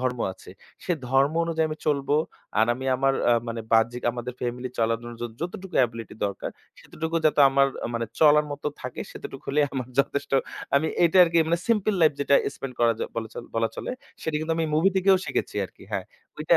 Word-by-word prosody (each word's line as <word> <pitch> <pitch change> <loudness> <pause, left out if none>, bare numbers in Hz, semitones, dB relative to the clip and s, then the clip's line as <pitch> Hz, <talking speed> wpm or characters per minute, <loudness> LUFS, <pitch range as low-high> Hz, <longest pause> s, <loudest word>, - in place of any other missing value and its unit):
ধর্ম 125 -1 -1
আছে - - -14 0.3
সে 180 - 0 0.2
ধর্ম 135 +3 +3
অনুযায়ী 160 -1 0
আমি 155 0 -5
চলবো। 145 -1 +2 0.4
আর 110 - +5
আমি 130 - -7
আমার 135 +1 +2 0.2
আ - - +6 0.2
মানে 115 0 -3
বাহ্যিক 115 +2 +3
আমাদের 120 +1 -5
ফ্যামিলি 125 +1 -3
চলার 115 0 +2
জন্য 120 0 -8
যদ 120 -1 -4
যতটুকু 180 +2 -6
অ্যাবিলিটি 115 -3 -2
দরকার 100 -1 -5 0.3
সেইটুকু 160 +1 -4
যাতে 150 -1 +3
আমার 135 0 +4 0.3
মানে 115 -1 -1
চলার 150 -1 +6
মত 145 - -8 0.2
থাকে 125 -1 -6
সেইটুকু 135 - -9
হলেই 145 +1 +3
আমার 130 -3 -3
যথেষ্ট 140 0 -3 0.4
আমি 140 +3 +3 0.2
এটা 170 +2 +3
আরকি 170 -1 +2
মানে 170 - +2
সিম্পল 215 -2 +2
লাইফ 155 -2 +6
যেটা 140 0 +3 0.2
স্পেন্ড 135 -2 -7
করা 115 -1 +5
য - - -9 0.2
বলা 115 -1 -3
চলে - - -7
বলা 115 0 +2
চলে - - -4 0.3
সেটা 160 -1 -1
কিন্তু 160 +1 -1
আমি 165 - +1
মুভি 160 +5 +4
থেকেও 190 0 +5
শিখেছি - - -2
আরকি - - -13
হ্যাঁ - - -1 0.3
ওইটা - - +4
140 Hz, 200 wpm, -25 LUFS, 120-160 Hz, 0.4 s, আ